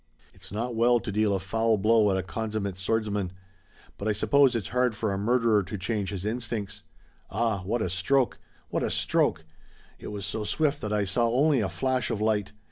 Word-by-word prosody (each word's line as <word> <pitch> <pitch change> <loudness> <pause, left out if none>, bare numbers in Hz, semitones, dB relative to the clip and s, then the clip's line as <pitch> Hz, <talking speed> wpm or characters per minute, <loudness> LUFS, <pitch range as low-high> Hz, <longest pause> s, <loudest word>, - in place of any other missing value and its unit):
It's - - -12
not 115 +4 -3
well 120 +1 +4
to 115 -3 -5
deal 105 0 +2
a - - -1
foul 110 +4 +1
blow 110 +1 +4
at 95 - +1
a 95 - -1
consummate 105 +1 -3
swordsman. 105 -1 -1 0.7
But 100 - -3
I 110 - +2
suppose 135 +4 +3
it's 105 -7 -2
hard 125 0 +1
for 105 -1 -1
a - - -2
murderer 115 -1 +3
to 100 +2 -6
change 100 +1 -2
his 100 -1 -5
instincts. 105 -3 -3 0.5
Ah, 110 -2 0
what 110 +3 0
a - - 0
stroke! 95 +9 +1 0.3
What - - -1
a - - 0
stroke! 80 - +1 0.5
It - - -8
was 100 -2 -4
so 110 - -2
swift 150 +6 0
that 105 - -3
I 105 -1 +1
saw 115 +5 +1
only 140 +3 +3
a 105 - 0
flash 130 -1 0
of 105 - -2
light! 105 -2 0
110 Hz, 205 wpm, -27 LUFS, 100-115 Hz, 0.7 s, well